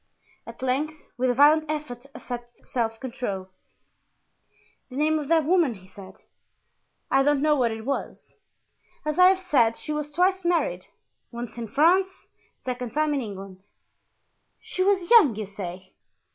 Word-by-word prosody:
At - - -10
length, 295 +4 -2
with 255 +1 0
a 245 - +1
violent 305 +3 +5
effort 280 -4 -5
at 240 -1 -7
self 225 -2 -2
control: 230 -7 -5 1.4
"The 255 - -10
name 310 +2 +2
of 295 - -5
that 325 0 +3
woman?" 330 -7 +2
he 185 -2 -16
said. 190 0 -14 0.9
"I 270 - +4
don't 290 0 +2
know 305 -1 +4
what 250 -4 +2
it 220 0 -6
was. 275 +1 -4 0.7
As 305 +2 -2
I 365 - +9
have 380 0 +4
said, 265 -12 +2
she 305 - -4
was 300 0 -4
twice 370 +3 +1
married, 350 +8 0 0.5
once 235 -1 -7
in 230 - -4
France, 365 - +2 0.3
the - - -39
second 250 -2 -4
time 305 0 +1
in 280 - 0
England." 195 -3 -9 0.9
"She 370 - -5
was 380 -2 +1
young, 365 - +7
you 215 0 -4
say?" 185 -2 -8
275 Hz, 160 wpm, -25 LUFS, 230-310 Hz, 1.4 s, I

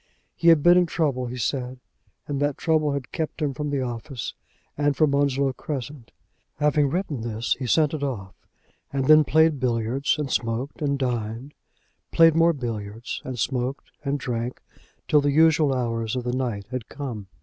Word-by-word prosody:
He 170 - -1
had 165 -3 +6
been 175 +1 +7
in 180 - +2
trouble, 140 -7 -1
he 125 +1 -6
said, 125 +2 -2 0.5
and 145 -2 -2
that 145 -1 0
trouble 155 -3 +1
had 140 -3 -5
kept 160 0 -4
him 145 -3 0
from 150 +2 -3
the 140 -2 -1
office 120 +1 -5 0.4
and 145 -1 +1
from 155 -3 +3
Onslow 140 -1 +1
Crescent. 135 -2 -6 0.4
Having 150 -1 +2
written 160 - -2
this, 115 0 -1
he 130 - -3
sent 150 +4 +3
it 155 - -3
off, 105 -9 -4 0.6
and 135 -1 -1
then 155 +2 +7
played 160 0 +3
billiards 125 +3 0
and 145 -3 -3
smoked 120 +7 -2
and 140 -1 0
dined, 120 +1 -3 0.6
played 165 -1 +6
more 165 +1 +4
billiards 115 -4 -5
and 130 -1 -5
smoked 130 +3 -2
and 140 0 0
drank 120 -1 -3 0.5
till 150 - +4
the 145 0 +1
usual 155 -1 +4
hours 115 -3 -1
of 125 - -2
the 125 0 -2
night 120 -6 -2
had 130 -3 -5
come. 120 -8 -6
135 Hz, 175 wpm, -24 LUFS, 120-150 Hz, 0.6 s, been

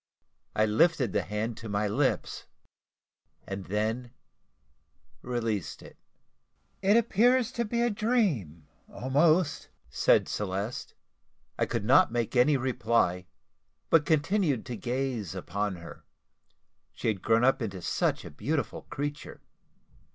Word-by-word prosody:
I 110 - +3
lifted 125 - +2
the - - +2
hand 105 +3 -3
to 115 - -8
my 105 +1 0
lips, 100 - -1 1.0
and 95 -1 -6
then 110 +6 -2 1.1
released 115 -7 -3
it. - - -13 0.9
"It 200 +3 +4
appears 235 +2 +3
to 235 - -2
be 235 +2 0
a 240 - +2
dream, 185 - 0 0.3
almost," 155 +5 +1 0.2
said - - +3
Celeste. 100 +3 -4 0.6
I - - +2
could 100 - -2
not 130 +1 +5
make 120 0 -2
any 135 +4 +5
reply, 115 -8 0 0.6
but 165 -2 +6
continued 155 - +1
to 125 - -5
gaze 120 - -3
upon 100 +1 -3
her 85 -1 -11 0.9
she - - -4
had 105 -4 0
grown 115 +1 +3
up 135 +1 +3
into 100 -4 -4
such - - 0
a - - -8
beautiful 145 - -3
creature. 145 +1 -5
120 Hz, 120 wpm, -28 LUFS, 105-155 Hz, 1.1 s, but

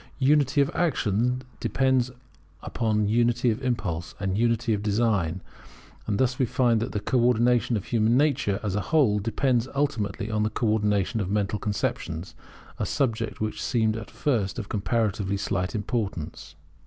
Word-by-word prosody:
Unity 140 0 +3
of 140 - +1
action 125 - 0 0.2
depends 130 -2 +1 0.5
upon 110 -3 0
unity 120 +2 +2
of 110 +4 -4
impulse, 90 - -2
and 95 -1 -1
unity 115 +1 +1
of 100 - -1
design; 100 -5 0 0.7
and 100 - 0
thus 130 +1 +1
we 130 - +3
find 120 -1 +2
that 115 - -3
the 105 - -2
co 125 +5 0
ordination 120 0 +3
of 100 - -6
human 115 +1 +2
nature, 140 -9 +1
as 100 -3 -1
a 105 - 0
whole, 135 -10 +3
depends 120 +3 0
ultimately 110 -8 -1
upon 110 -1 0
the 105 - +1
co 115 - -2
ordination 105 0 +1
of 95 - -3
mental 105 0 0
conceptions, 95 -4 -3 0.5
a - - 0
subject 115 -6 -1
which 110 0 -3
seemed 110 -4 +1
at 110 0 -7
first 115 -5 -1
of 110 -5 -5
comparatively 100 -1 0
slight 95 0 -2
importance. 95 -8 -4
110 Hz, 160 wpm, -26 LUFS, 100-125 Hz, 0.7 s, Unity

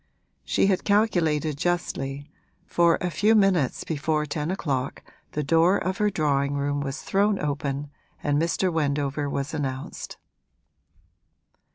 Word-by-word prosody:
She - - +2
had 195 -2 +2
calculated 165 -8 +1
justly, 145 -5 -2 0.4
for 170 -1 +3
a 180 - -1
few 210 +8 +3
minutes 190 - +2
before 155 0 -1
ten 150 +1 -3
o'clock 140 -8 -2 0.3
the 150 - -1
door 165 +6 +4
of 190 +1 -2
her 210 0 +3
drawing 145 -5 0
room 145 0 -1
was 140 +1 -4
thrown 200 +1 +2
open 145 -1 -3 0.3
and 145 0 +2
Mr. 170 +2 0
Wendover 145 -2 0
was 140 +2 -3
announced. 135 -3 -4
150 Hz, 130 wpm, -25 LUFS, 140-180 Hz, 0.4 s, door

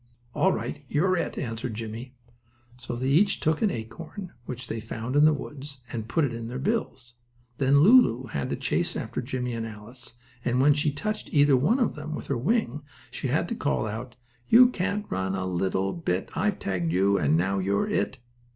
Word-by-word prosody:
"All - - +3
right, - - -4
you're 185 +6 +2
it," 175 - -2
answered 115 -1 -4
Jimmie. 115 +3 -7 0.6
So 120 0 -5
they 125 +2 -3
each 195 +8 +3
took 155 0 +1
an 215 - +3
acorn 165 - -7
which 125 0 -5
they 115 -1 -4
found 115 +3 -5
in 145 +1 +6
the 155 - +6
woods 140 -2 -6
and 110 -2 -4
put 155 +5 +2
it 125 - -3
in 115 0 -5
their 125 +2 -5
bills. 130 - -3 0.4
Then 140 +1 +4
Lulu 180 - +6
had 70 -8 -3
to - - -1
chase - - -1
after - - -3
Jimmie 125 -1 -3
and 115 -1 -3
Alice, 115 +3 -11 0.3
and 125 +1 +1
when 145 +2 +6
she 145 +1 +1
touched 215 +9 -4
either 145 -1 +5
one 150 - +3
of 245 -5 +1
them 155 0 -6
with - - -6
her 140 - +1
wing 205 - 0 0.3
she - - -3
had 150 +7 +1
to 235 - -2
call 145 - 0
out: 115 +3 -5 0.3
"You 245 +2 +8
can't 200 -1 -2
run 95 0 -1
a 95 -1 -2
little 95 +1 0
bit, 95 - -2
I've 210 -2 +1
tagged 90 -4 -2
you, 100 +3 +3
and 75 +2 +3
now 95 +3 +1
you're 100 +2 +1
it." 115 +6 -1
130 Hz, 200 wpm, -26 LUFS, 110-155 Hz, 0.6 s, You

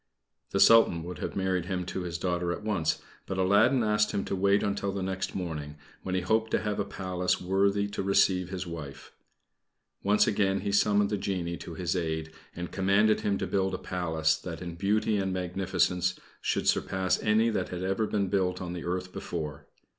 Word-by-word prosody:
The - - -1
Sultan 115 -8 +6
would 90 -1 -7
have - - -4
married 95 -2 0
him 90 -2 -2
to 95 - -4
his 85 -1 -4
daughter 85 -1 -1
at 85 - -5
once; 100 -7 0 0.2
but 95 - -3
Aladdin 100 +7 +4
asked 105 -1 +2
him 100 - -1
to - - -2
wait 100 +2 +3
until 100 0 -1
the 95 -1 -3
next 95 0 -3
morning, 75 -5 -4 0.3
when 95 - -3
he 95 - +1
hoped 110 +5 +1
to - - +1
have 105 -1 -2
a - - +2
Palace 90 -2 -1
worthy 100 +2 +2
to 100 - -3
receive 95 -2 +2
his 95 -1 -4
wife. 80 -5 -8 0.9
Once 105 +1 +4
again 95 -1 +1
he 100 - -2
summoned 100 0 +3
the 105 - +1
genie 90 -3 -2
to 85 - -8
his 90 +1 -1
aid, 80 -2 -2 0.2
and 90 0 -5
commanded 100 +3 +3
him 100 -1 0
to - - -2
build 95 -1 0
a - - -3
Palace 80 -3 0
that 80 0 -7
in 85 -1 -6
beauty 105 +4 +1
and 95 -1 -1
magnificence 90 0 0 0.2
should - - -1
surpass 95 -1 +1
any 110 +2 +3
that 95 -4 -2
had 90 0 -4
ever 95 +3 0
been 100 -2 0
built 90 -1 0
on 90 -1 -5
the 85 - -5
earth 90 +1 -3
before. 75 -4 -5
95 Hz, 200 wpm, -29 LUFS, 90-100 Hz, 0.9 s, Sultan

